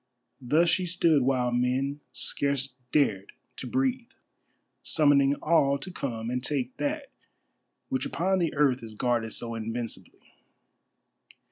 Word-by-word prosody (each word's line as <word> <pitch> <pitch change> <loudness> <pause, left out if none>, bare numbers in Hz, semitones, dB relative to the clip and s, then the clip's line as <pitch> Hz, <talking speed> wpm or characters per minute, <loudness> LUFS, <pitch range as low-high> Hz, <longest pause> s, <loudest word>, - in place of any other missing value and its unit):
Thus 155 +7 +3
she 180 +2 +2
stood 165 -4 +3
while 125 -1 +1
men 130 +4 0
scarce 135 +1 0 0.2
dared 105 -10 +1 0.2
to - - -6
breathe, 260 -2 -1 0.7
summoning 145 -2 +4
all 140 -4 +3
to 140 +7 -7
come 115 -8 -4
and 125 0 -2
take 130 -3 -1
that 290 -1 -3 0.8
which 265 -1 -1
upon 190 +2 0
the 170 -3 -1
earth 140 -3 +2
is 110 -2 -9
guarded 115 -1 0
so 115 +1 -4
invincibly. 115 +1 -5
140 Hz, 125 wpm, -27 LUFS, 125-170 Hz, 0.8 s, summoning